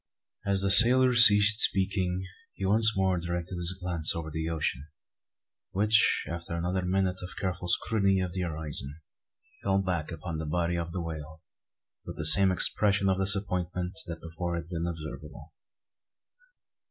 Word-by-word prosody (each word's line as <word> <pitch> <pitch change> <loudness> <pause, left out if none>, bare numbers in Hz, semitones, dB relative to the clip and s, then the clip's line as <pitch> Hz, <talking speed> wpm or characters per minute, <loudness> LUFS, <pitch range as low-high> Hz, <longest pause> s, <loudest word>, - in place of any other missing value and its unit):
As 100 -1 +2
the 100 - 0
sailor 125 +5 +6
ceased 105 -2 +7
speaking 95 -2 +1 0.3
he 95 - -6
once 110 +2 +3
more 95 -2 -1
directed 85 +1 -7
his 90 +2 -2
glance 85 -3 -1
over 80 -1 -7
the 80 +1 -5
ocean; 75 -3 -5 0.9
which, 105 +3 +2
after 85 0 -6
another 90 +2 -4
minute 95 0 -3
and 90 - -9
careful 90 -2 -5
scrutiny 100 0 -1
of 90 -2 -5
the 95 - -5
horizon, 75 -4 -8 0.7
fell 95 0 -1
back 90 -4 -5
upon 80 0 -8
the 80 - -7
body 85 +2 -3
of 85 -1 -6
the 90 0 -6
whale, 80 -1 -10 0.6
with - - -11
the 75 - -5
same 95 +5 +7
expression 100 +1 +2
of 95 0 -2
disappointment 90 -2 -2
that 85 -1 -9
before 85 +1 -6
had 85 0 -8
been 85 -1 -5
observable. 80 -2 -10
90 Hz, 155 wpm, -26 LUFS, 85-95 Hz, 0.9 s, ceased